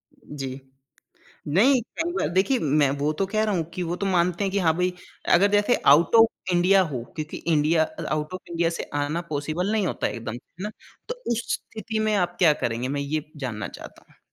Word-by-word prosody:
जी, 135 -2 -7 0.9
नहीं 235 - +4 0.2
कई 335 +1 0
बार - - 0
देखिए 250 +7 +3 0.2
मैं 140 - +4
वो 150 - +2
तो - - +3
कह 215 0 +2
रहा 210 -3 +1
हूँ 165 - 0
कि 180 - -3
वो - - 0
तो 200 - -3
मानते 180 0 +1
हैं 195 - 0
कि 200 - +1
हाँ, 160 -3 +3
भई 180 0 +1 0.4
अगर 200 +4 +5
जैसे 205 +4 +3 0.2
आउट 165 +8 +3
ऑफ 225 -5 +3
इंडिया 185 +2 +5
हो, 120 -3 -3
क्योंकि 155 -1 -5
इंडिया 160 0 +2 0.3
आउट 150 +2 -2
ऑफ 185 - -4
इंडिया 170 0 +1
से - - -2 0.2
आना 150 +4 -1
पॉसिबल 155 +6 -2
नहीं 215 -4 +1
होता - - -1
है - - -4
एकदम 115 -2 -5
है 120 - -7 0.2
ना? 210 - -2 0.4
तो 485 - -2 0.2
उस 235 0 0
स्थिति 220 0 -4
में - - +1
आप 175 -2 0
क्या 160 -5 +6
करेंगे 120 +2 -1
मैं - - -1
ये 150 +1 -2 0.2
जानना 110 -3 -4
चाहता - - -12
हूँ। - - -26
175 Hz, 215 wpm, -25 LUFS, 150-200 Hz, 0.9 s, क्या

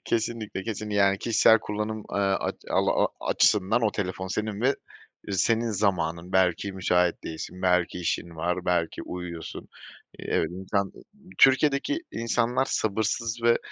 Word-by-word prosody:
Kesinlikle, 110 -3 -2
kesin 110 -1 -5
yani 100 -1 +3
kişisel 115 0 +5
kullanım, 105 +1 -3
eee, - - -2
aç, 95 -1 0 0.2
al - - +2
a - - +3 0.2
açısından 105 +4 +3
o 110 - +3
telefon 95 -2 -3
senin 105 +1 -3
ve, 125 - +2
ııı, 100 -7 -6
senin 115 +2 +2
zamanın 90 -4 -1
belki 95 +1 +2
müsait 90 -2 +1
değilsin, 85 +3 -7
belki 90 -1 +2
işin 85 -1 -3
var, 90 +2 -2
belki 85 -2 0
uyuyorsun. 85 -2 -7 0.5
Evet, - - 0
insan, 95 +2 -2 0.5
Türkiye'deki 140 - +4
insanlar 115 +2 +1
sabırsız 115 +1 -1
ve 115 0 +4
100 Hz, 135 wpm, -26 LUFS, 90-115 Hz, 0.5 s, kişisel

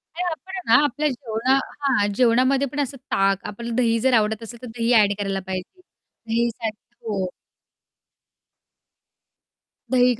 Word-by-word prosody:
नाही 360 - -2
आपण 350 +4 -8
आहे 350 -10 +4
ना 290 - +4
आपल्या 295 +2 0
जेवणा 245 -1 -1 0.3
हां, 260 -8 +2
जेवणामध्ये 255 +4 +3
पण 285 +3 -5
असं 275 -1 -2
ताक 195 0 +2
आपल्याला 235 +3 -5
दही 230 -2 +2
जर 260 +3 +2
आवडत 220 +1 0
असेल 230 +1 -10
तर 250 - -7
दही 230 +1 -1
ॲड 210 -3 +5
करायला 195 -1 -1
पाहिजे. 190 - -6
दही 235 -9 -3
साठ 225 -1 -4 0.3
हो. 200 -4 -2 2.6
दही 250 -1 +5
235 Hz, 145 wpm, -23 LUFS, 220-265 Hz, 2.6 s, ॲड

